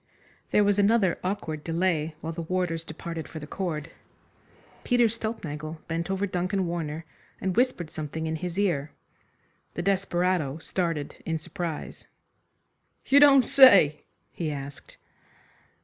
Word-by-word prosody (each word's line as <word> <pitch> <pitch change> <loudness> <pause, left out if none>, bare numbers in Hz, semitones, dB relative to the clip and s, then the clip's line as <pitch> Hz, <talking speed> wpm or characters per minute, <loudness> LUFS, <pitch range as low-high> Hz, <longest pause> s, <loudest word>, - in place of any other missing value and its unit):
There 210 - +4
was 205 0 +2
another 200 -3 +3
awkward 165 -5 -3
delay 165 -2 0
while 165 +1 -4
the 170 - -5
warders 165 -1 -1
departed 165 0 -6
for - - -9
the 150 - -6
cord. 155 -2 -4 0.9
Peter 245 -1 +3
Stulpnagel 165 -9 -5
bent 165 +2 -3
over 195 +1 0
Duncan 185 0 -1
Warner, 165 -2 -4 0.3
and 190 -2 -2
whispered 240 -10 +1
something 155 +1 -5
in 160 0 -2
his 175 +2 -5
ear. 165 -8 0 0.8
The 175 - -3
desperado 180 -6 0
started 165 -3 -3
in 165 -1 -1
surprise. 165 0 -6 1.0
"You 280 - +6
don't 275 -3 +7
say?" 200 - +7 0.3
he 165 -3 -3
asked. 140 -1 -8
170 Hz, 130 wpm, -27 LUFS, 155-195 Hz, 1.0 s, don't